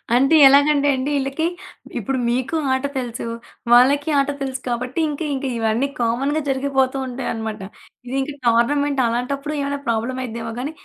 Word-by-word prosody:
అంటే 275 Hz, +5 st, +4 dB
ఎలాగంటే 285 Hz, +1 st, +4 dB
అండి, 260 Hz, +2 st, -2 dB
ఈళ్ళకి 275 Hz, +4 st, -2 dB, 0.5 s
ఇప్పుడు 260 Hz, +5 st, -2 dB
మీకు 250 Hz, +6 st, -1 dB, 0.2 s
ఆట 260 Hz, +1 st, -1 dB
తెలుసు. 245 Hz, -1 st, -4 dB, 0.5 s
వాళ్ళకి 275 Hz, +5 st, +5 dB
ఆట 275 Hz, -, +1 dB
తెలుసు 265 Hz, -1 st, -3 dB
కాబట్టి 250 Hz, +5 st, -2 dB
ఇంక 290 Hz, +1 st, -5 dB
ఇంక 270 Hz, 0 st, -3 dB
ఇవన్నీ 225 Hz, +4 st, +1 dB
కామన్‌గా 270 Hz, +7 st, 0 dB
జరిగిపోతూంటాయి 265 Hz, -1 st, -1 dB
అన్నమాట. 220 Hz, -1 st, -4 dB, 0.5 s
ఇది 255 Hz, -, -4 dB
ఇంక 280 Hz, +2 st, -3 dB
టోర్నమెంట్ 275 Hz, +4 st, +2 dB
అలాంటప్పుడు 275 Hz, +5 st, -2 dB
ఏమైనా 280 Hz, 0 st, -2 dB
ప్రాబ్లమ్ 235 Hz, +3 st, -1 dB
అయిద్దేమో 230 Hz, -1 st, -5 dB
గానీ, 275 Hz, +4 st, -3 dB
265 Hz, 145 wpm, -21 LUFS, 240-280 Hz, 0.5 s, వాళ్ళకి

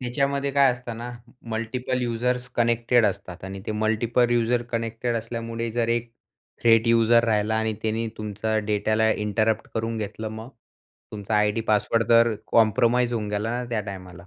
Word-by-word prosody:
त्याच्यामध्ये 140 Hz, +3 st, -1 dB
काय 140 Hz, -1 st, +5 dB
असतं 125 Hz, -2 st, -7 dB
ना, 120 Hz, +2 st, -6 dB, 0.4 s
मल्टिपल 125 Hz, +3 st, -2 dB
युजर्स 125 Hz, +1 st, -1 dB
कनेक्टेड 120 Hz, 0 st, +3 dB
असतात 95 Hz, -2 st, -5 dB
आणि 95 Hz, 0 st, -7 dB
ते -, -, -2 dB
मल्टिपल 110 Hz, +3 st, +1 dB
युजर 120 Hz, 0 st, +2 dB
कनेक्टेड 115 Hz, +1 st, -2 dB
असल्यामुळे 115 Hz, 0 st, -4 dB
जर 115 Hz, 0 st, 0 dB
एक 120 Hz, 0 st, -1 dB, 0.5 s
थ्रेट 115 Hz, 0 st, +5 dB
युजर 115 Hz, 0 st, +4 dB
राहिला 110 Hz, -1 st, +1 dB
आणि 110 Hz, 0 st, 0 dB
त्यानी 110 Hz, +1 st, -1 dB
तुमचा 110 Hz, +1 st, -2 dB
डेटाला 110 Hz, +1 st, +1 dB
इंटरप्ट 110 Hz, +1 st, 0 dB
करून 115 Hz, +1 st, -2 dB
घेतलं 110 Hz, +1 st, -5 dB
मग? 110 Hz, +2 st, -8 dB, 0.6 s
तुमचा 105 Hz, +1 st, -3 dB
आयडी 105 Hz, +1 st, +2 dB
पासवर्ड 110 Hz, +1 st, +2 dB
तर 115 Hz, -1 st, +5 dB, 0.2 s
कॉम्प्रोमाईज 120 Hz, +2 st, +3 dB
होऊन 110 Hz, -3 st, -2 dB
गेला 105 Hz, +2 st, -2 dB
ना 125 Hz, +1 st, -2 dB
त्या 115 Hz, -3 st, -1 dB
टायमाला. 90 Hz, -3 st, -9 dB
115 Hz, 155 wpm, -24 LUFS, 110-120 Hz, 0.6 s, काय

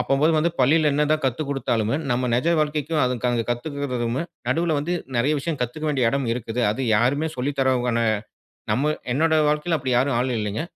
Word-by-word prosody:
அப்பம்போது 145 Hz, +4 st, +2 dB
வந்து 165 Hz, +3 st, +2 dB
பள்ளியில 150 Hz, +3 st, +4 dB
என்னதான் 150 Hz, +2 st, +1 dB
கத்து 130 Hz, +4 st, 0 dB
கொடுத்தாலும், 115 Hz, -5 st, -1 dB, 0.2 s
நம்ம 125 Hz, +1 st, 0 dB
நிஜ 130 Hz, +8 st, +1 dB
வாழ்க்கைக்கும் 150 Hz, +1 st, 0 dB
அதுக்கு 120 Hz, -2 st, 0 dB
கத்துக்குறதுவுமே 125 Hz, 0 st, -2 dB, 0.3 s
நடுவுல 160 Hz, +3 st, +1 dB
வந்து 160 Hz, +5 st, -2 dB, 0.2 s
நிறைய 135 Hz, +6 st, +2 dB
விஷயம் 155 Hz, +1 st, -3 dB
கத்துக்க 155 Hz, +6 st, -4 dB
வேண்டிய 130 Hz, -6 st, +2 dB
இடம் 140 Hz, -2 st, -1 dB
இருக்குது. 120 Hz, 0 st, -3 dB
அது 110 Hz, +6 st, -3 dB, 0.2 s
யாருமே 140 Hz, +8 st, +1 dB
சொல்லித் 140 Hz, +3 st, -3 dB
தர்றவங்க 125 Hz, -3 st, +1 dB, 0.7 s
நம்ம 150 Hz, +4 st, +1 dB, 0.2 s
என்னோட 160 Hz, +5 st, +2 dB, 0.2 s
வாழ்க்கைல 150 Hz, +2 st, 0 dB
அப்படி 130 Hz, -2 st, -2 dB
யாரும் 130 Hz, -1 st, +1 dB
ஆளு 125 Hz, +1 st, 0 dB
இல்லைங்க. 105 Hz, +1 st, -2 dB
135 Hz, 165 wpm, -23 LUFS, 120-150 Hz, 0.7 s, பள்ளியில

